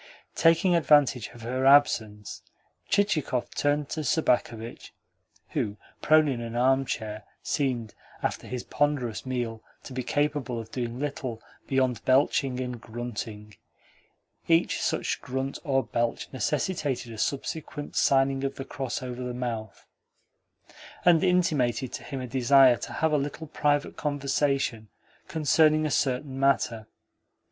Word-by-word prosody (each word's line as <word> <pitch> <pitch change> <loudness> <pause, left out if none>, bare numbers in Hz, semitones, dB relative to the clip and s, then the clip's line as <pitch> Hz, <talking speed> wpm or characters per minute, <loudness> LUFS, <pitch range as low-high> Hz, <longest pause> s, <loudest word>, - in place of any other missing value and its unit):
Taking 165 +2 +4
advantage 145 -7 +4
of 120 -1 -13
her 130 +3 0
absence, 110 -7 +3 0.5
Chichikov 175 -11 +1
turned 145 0 0
to 160 - -3
Sobakevitch 120 -5 0 0.6
(who, 105 0 -2 0.2
prone 155 0 +5
in 130 -4 -2
an 115 0 -6
armchair, 120 -4 0 0.2
seemed, 125 -6 -1 0.3
after - - -2
his 125 -1 -4
ponderous 135 -5 -1
meal, 120 -3 -3 0.2
to 130 - -9
be 130 - -2
capable 145 -2 -1
of 115 0 -9
doing 120 -2 -3
little 130 -4 -4 0.3
beyond 130 -4 +1
belching 130 -1 +2
and 125 -2 -4
grunting 110 -2 -6 0.9
each 165 0 +2
such - - -1
grunt 130 +1 -3
or 135 -2 +1
belch 120 0 -2
necessitating 135 -3 -1
a - - -9
subsequent 145 +3 -3
signing 135 0 +3
of 135 0 -2
the 135 - -6
cross 135 -2 -4
over 125 0 -5
the 125 -1 -4
mouth), 115 -4 -5 1.2
and 175 0 +6
intimated 145 -9 +1
to - - -6
him 135 -2 -5
a - - -4
desire 130 0 +5
to - - -7
have 160 -1 +1
a 150 - +3
little 145 +3 -4
private 145 -1 0
conversation 140 -5 0 0.4
concerning 155 0 +3
a 150 - -1
certain 135 0 0
matter. 120 -5 +1
130 Hz, 130 wpm, -27 LUFS, 120-145 Hz, 1.2 s, and